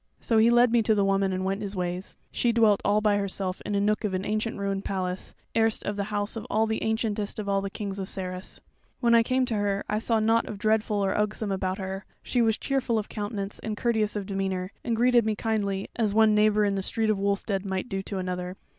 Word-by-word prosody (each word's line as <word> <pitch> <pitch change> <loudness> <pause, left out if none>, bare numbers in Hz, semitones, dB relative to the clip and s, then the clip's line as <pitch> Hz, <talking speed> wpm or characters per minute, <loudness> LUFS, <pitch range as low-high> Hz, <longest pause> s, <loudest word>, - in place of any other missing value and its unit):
So 225 -2 +2
he 225 +2 +6
led 240 0 +5
me 235 -1 +4
to 220 0 +3
the 200 -1 +2
woman 195 0 +2
and 185 0 -2
went 195 +2 -1
his 200 -1 -4
ways. 180 +1 -4
She 240 - +1
dwelt 220 -3 +4
all 205 +1 +3
by 210 -1 +3
herself 195 -2 -2
in 205 - -2
a - - +2
nook 210 +2 +1
of 200 -3 -1
an 185 +1 -2
ancient 215 +2 -1
ruined 200 -1 -2
palace, 185 -1 -3 0.2
erst 225 -1 +2
the 200 0 -2
house 205 +1 -2
of 225 - -6 0.2
the 220 - -1
ancientest 220 -2 -1
of 210 -2 -4
all 195 0 +1
the 195 - -3
kings 200 -1 -5
of 190 - -3
Sarras. 185 -1 -5 0.4
When 235 -2 +3
I 230 - +7
came 255 +2 +1
to 245 - -3
her, 200 -1 0
I 210 - 0
saw 225 0 +1
nought 220 -1 +1
dreadful 215 -1 +1
or 190 - 0
ugsome 210 0 -1
about 190 -1 -1
her: 190 0 -5 0.2
she 245 - +1
was 225 -1 +2
cheerful 265 -4 0
of 215 - -3
countenance 205 -1 -4
and 215 -1 -4
courteous 220 -3 +1
of 205 -2 -3
demeanour, 190 -1 -2
and 230 - 0
greeted 240 +1 +4
me 215 0 0
kindly 200 -3 -1
as 215 -3 0
one 220 -1 +5
neighbour 210 0 +4
in 200 - +1
the 195 - -1
street 220 +3 0
of 205 - -1
Wulstead 200 0 0
might 190 +1 -3
do 195 -4 -3
to 195 0 -5
another. 180 0 -4
205 Hz, 235 wpm, -27 LUFS, 195-220 Hz, 0.4 s, I